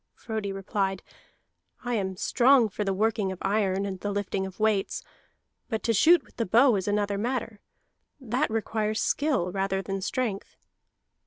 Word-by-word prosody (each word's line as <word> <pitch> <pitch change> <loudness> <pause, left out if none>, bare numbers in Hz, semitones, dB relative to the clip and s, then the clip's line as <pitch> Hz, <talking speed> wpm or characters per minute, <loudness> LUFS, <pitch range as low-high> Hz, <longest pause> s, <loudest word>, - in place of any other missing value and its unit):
Frodi 220 -3 -4
replied: 195 -1 -2 0.8
"I 245 - -1
am 190 -4 -2
strong 245 +2 +4
for 210 - -3
the 195 - 0
working 205 0 0
of 190 - -6
iron 195 -1 +1
and 190 -2 -4
the 205 - -3
lifting 200 -1 -2
of 190 - -12
weights, 215 -2 0 0.7
but 220 -3 -2
to 230 - +2
shoot 335 - +5
with - - -24
the 230 - 0
bow 240 +5 +5
is 190 -1 -2
another 205 -1 0
matter. 230 -2 -3 0.6
That 260 +3 -1
requires 220 -1 -1
skill 275 - 0
rather 195 0 -1
than 195 0 -4
strength." 205 0 -3
205 Hz, 160 wpm, -27 LUFS, 195-230 Hz, 0.8 s, shoot